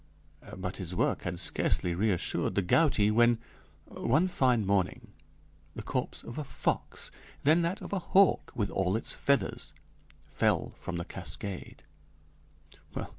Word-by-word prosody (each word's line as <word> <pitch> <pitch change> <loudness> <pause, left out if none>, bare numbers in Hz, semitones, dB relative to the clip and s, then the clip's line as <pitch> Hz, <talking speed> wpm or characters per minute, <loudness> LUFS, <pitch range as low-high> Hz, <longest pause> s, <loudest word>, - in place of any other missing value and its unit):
But 95 0 -4
his 90 -2 -5
work - - +1
had 85 0 -4
scarcely 90 0 +2
reassured 90 -1 0
the 100 - +2
gouty 105 - +3
when, 120 +1 +5 0.5
one 155 +10 +1
fine 125 - +2
morning, 95 -2 0 0.6
the - - -6
corpse - - -3
of 120 - -7
a - - -2
fox, 135 - -2 0.3
then 155 +4 +5
that 175 +5 -1
of 185 - -7
a 195 - +1
hawk 190 +2 +3
with 105 -4 -1
all 95 0 +1
its 115 - 0
feathers, 140 0 0 0.5
fell - - +1
from - - -5
the 85 0 -3
cascade. 100 -2 -6
110 Hz, 135 wpm, -30 LUFS, 95-145 Hz, 0.6 s, when